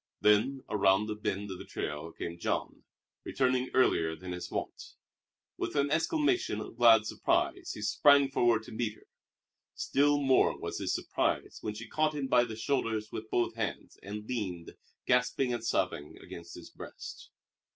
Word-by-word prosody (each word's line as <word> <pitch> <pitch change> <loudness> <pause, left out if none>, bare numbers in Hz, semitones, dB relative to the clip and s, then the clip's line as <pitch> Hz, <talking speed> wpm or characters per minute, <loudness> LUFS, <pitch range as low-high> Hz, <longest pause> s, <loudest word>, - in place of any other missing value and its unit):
Then 115 +6 +3
around 100 +1 +2
a - - -2
bend 105 -1 -3
of 95 - -7
the - - -7
trail 75 +2 -5
came 85 +1 -6
Jean, - - -3 0.4
returning 130 -1 0
earlier 80 -11 +3
than 90 +2 -8
his 90 0 -5
wont. - - -5 0.6
With - - -3
an 140 0 +1
exclamation 295 - +1
of 110 - -7
glad 115 -2 +6
surprise - - 0
he 105 - -7
sprang 140 +4 +5
forward 120 -4 +3
to - - -11
meet 110 -1 -2
her. - - -21 0.7
Still 145 +1 +2
more 135 -2 +3
was - - -5
his - - -1
surprise - - -1
when 105 -1 -4
she 115 +2 -8
caught 155 0 0
him 145 -2 -2
by 125 -2 +4
the 110 -2 -6
shoulders 110 -3 -1
with 110 0 -6
both 120 0 +1
hands 110 -2 -5
and 105 +2 -7
leaned, 95 -9 -4 0.3
gasping 125 +1 +2
and 120 -2 -3
sobbing, 90 -9 -1
against 85 0 -10
his 85 - -11
breast. - - -10
110 Hz, 165 wpm, -31 LUFS, 100-130 Hz, 0.7 s, glad